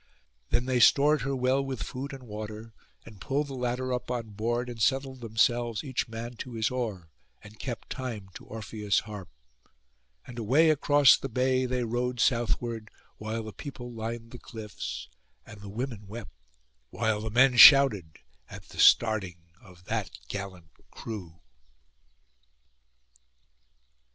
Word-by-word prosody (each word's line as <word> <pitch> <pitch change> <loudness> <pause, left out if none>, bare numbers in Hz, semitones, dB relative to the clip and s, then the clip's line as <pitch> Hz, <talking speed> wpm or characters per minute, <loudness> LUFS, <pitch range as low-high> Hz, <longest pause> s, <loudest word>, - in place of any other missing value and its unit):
Then 120 - +1
they 130 -1 +1
stored 145 +4 +5
her 135 +3 -2
well 130 +2 +1
with 130 -8 -4
food 130 - -6
and 135 -2 -9
water, 110 0 -8 0.3
and 105 -5 -14
pulled 145 +2 -1
the 140 - -8
ladder 125 0 -2
up 125 - -4
on 120 -3 -3
board, 120 +4 -2
and 120 -2 -7
settled 135 +2 0
themselves 115 0 +1
each 130 -4 -2
man 115 +2 -7
to 125 - -7
his 110 +1 0
oar, 105 -10 -4 0.3
and 105 +1 -14
kept 120 -4 -6
time 115 -7 -5
to - - -11
Orpheus' 105 -2 -2
harp; 105 -4 -9 1.0
and 120 -1 -9
away 140 +9 +4
across 145 -2 +5
the 135 - -6
bay 130 +1 +1
they 125 0 -1
rowed 120 +1 -2
southward, 115 -2 0 0.3
while 110 +1 -4
the 110 -1 -8
people 125 -4 -8
lined 115 +1 -6
the 125 - -10
cliffs; 110 -3 -7 0.4
and 105 -2 -12
the 100 - -9
women 110 -1 -5
wept, 105 -1 -8 0.6
while 110 -2 -1
the 110 - -4
men 125 +3 +4
shouted, 120 - +8 0.3
at - - -11
the - - -11
starting 95 -7 +3
of 90 -4 -17
that - - -2 0.2
gallant 95 -4 -7 0.2
crew. 90 -7 -8
115 Hz, 145 wpm, -28 LUFS, 105-130 Hz, 1.0 s, shouted